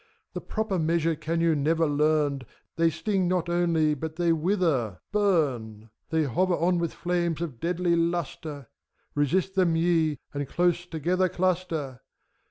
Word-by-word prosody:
The - - -4
proper 215 -4 -2
measure 165 0 +1
can 165 +2 -2
you 165 -1 +3
never 160 +3 +2
learnt 145 -2 +1 0.3
They 165 0 +3
sting 190 +2 -1
not 180 -1 0
only, 170 -3 +2
but 155 +2 -5
they 170 -1 +2
wither, 160 - 0
bum! 130 - 0 0.2
They 160 -1 +1
hover 175 +7 +1
on 175 +2 +1
with 170 -1 -1
flames 175 -3 -1
of 155 -9 -5
deadly 175 +2 +1
lustre: 165 -4 -2 0.5
Resist 175 +7 +1
them 180 -4 +2
ye, 165 -3 +2 0.2
and 145 -1 -3
close 175 +2 +1
together 180 +3 0
cluster! 170 -7 -1
165 Hz, 145 wpm, -26 LUFS, 150-175 Hz, 0.5 s, you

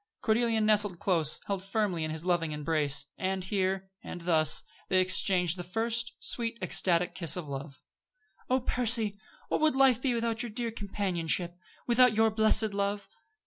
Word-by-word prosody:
Cordelia 225 0 +1
nestled 210 -3 +3
close, 165 -5 +1
held 195 -2 -3
firmly 195 -4 -2
in 155 - -3
his 160 +2 -4
loving 170 -4 0
embrace. 150 -2 0
And 190 0 -2
here, 190 0 -2
and 175 - -8
thus, 160 -3 +3 0.3
they 185 - +3
exchanged 185 -1 +2
the 175 - -5
first 230 +6 -2
sweet, 230 -1 -2
ecstatic 180 -2 +1
kiss 170 -4 -1
of 170 -4 -6
love. 140 +1 -8 0.7
"Oh, 255 +1 +2
Percy! 225 -4 +2 0.3
What - - -1
would 310 -3 +3
life 265 -3 +4
be 255 -3 0
without 230 -1 -1
your 240 - -4
dear 230 +1 -4
companionship, 185 -5 -2 0.3
without 245 -1 +4
your 220 0 +3
blessed 220 0 +2
love?" 200 0 -2
195 Hz, 160 wpm, -29 LUFS, 175-225 Hz, 0.7 s, life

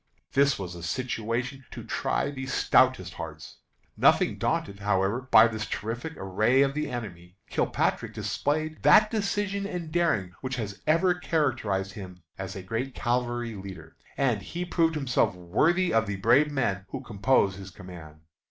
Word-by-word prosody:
This 140 0 +3
was 90 -3 -6
a 85 - -9
situation 120 - -3
to - - -8
try 140 - -1
the 130 -2 -6
stoutest - - +3
hearts. - - -8 0.4
Nothing - - +3
daunted, 100 0 -1
however, 100 +3 +1
by 110 -1 +8
this 110 -2 -4
terrific 120 +9 -4
array 110 +8 +2
of 135 0 0
the 150 0 -2
enemy, 90 -7 -7
Kilpatrick - - 0
displayed 155 +2 -2
that 215 0 +6
decision 200 -2 -1
and 175 -5 -5
daring 135 - +1
which 130 -1 -3
have 110 -5 -4
ever 170 +4 +4
characterized 120 - -1
him 90 -4 -10
as 95 -1 -6
a 95 - -6
great 115 +7 -3
cavalry 120 -1 -1
leader, 95 -5 -9 0.2
and 125 -7 +1
he 175 - -5
proved 165 -2 +1
himself 135 -10 +1
worthy 155 - +1
of 115 -1 +2
the 100 - -2
brave 120 +10 +3
men 100 -9 -1
who - - -5
compose 100 -3 +1
his 95 -1 -9
command. 85 -5 -12
120 Hz, 155 wpm, -27 LUFS, 95-145 Hz, 0.4 s, by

